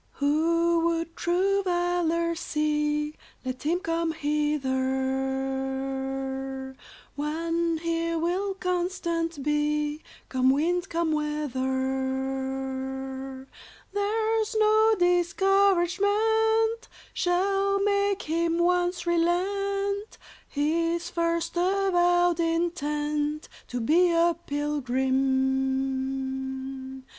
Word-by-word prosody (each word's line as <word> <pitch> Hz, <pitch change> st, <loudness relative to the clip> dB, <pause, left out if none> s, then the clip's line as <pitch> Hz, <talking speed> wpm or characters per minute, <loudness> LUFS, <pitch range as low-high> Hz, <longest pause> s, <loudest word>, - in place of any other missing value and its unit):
"Who 335 Hz, +4 st, +2 dB
would 335 Hz, 0 st, -2 dB
true 385 Hz, +3 st, +1 dB
valor 350 Hz, -2 st, 0 dB
see, 300 Hz, -2 st, -1 dB, 0.3 s
Let 255 Hz, 0 st, -4 dB
him 335 Hz, +4 st, +1 dB
come 330 Hz, -1 st, -1 dB
hither; 265 Hz, -2 st, -2 dB, 0.4 s
One 330 Hz, +3 st, -1 dB
here 335 Hz, 0 st, 0 dB
will 370 Hz, +4 st, -1 dB
constant 345 Hz, -4 st, -2 dB
be, 300 Hz, +1 st, 0 dB, 0.3 s
Come 260 Hz, 0 st, +2 dB
wind, 350 Hz, +7 st, +1 dB
come 335 Hz, -1 st, 0 dB
weather; 265 Hz, -2 st, -2 dB, 0.5 s
There's 440 Hz, +2 st, 0 dB
no 435 Hz, +1 st, +5 dB
discouragement 400 Hz, +5 st, +2 dB, 0.3 s
Shall 390 Hz, +2 st, +1 dB
make 400 Hz, -1 st, +1 dB
him 335 Hz, +1 st, 0 dB
once 355 Hz, 0 st, +1 dB
relent 395 Hz, +4 st, 0 dB, 0.3 s
His 335 Hz, +3 st, 0 dB
first 335 Hz, 0 st, -1 dB
avowed 355 Hz, -2 st, +2 dB
intent 300 Hz, -3 st, -1 dB, 0.2 s
To 245 Hz, -, -4 dB
be 330 Hz, +9 st, +4 dB
a 335 Hz, 0 st, +3 dB
pilgrim. 265 Hz, -1 st, -1 dB
330 Hz, 75 wpm, -27 LUFS, 270-355 Hz, 0.5 s, no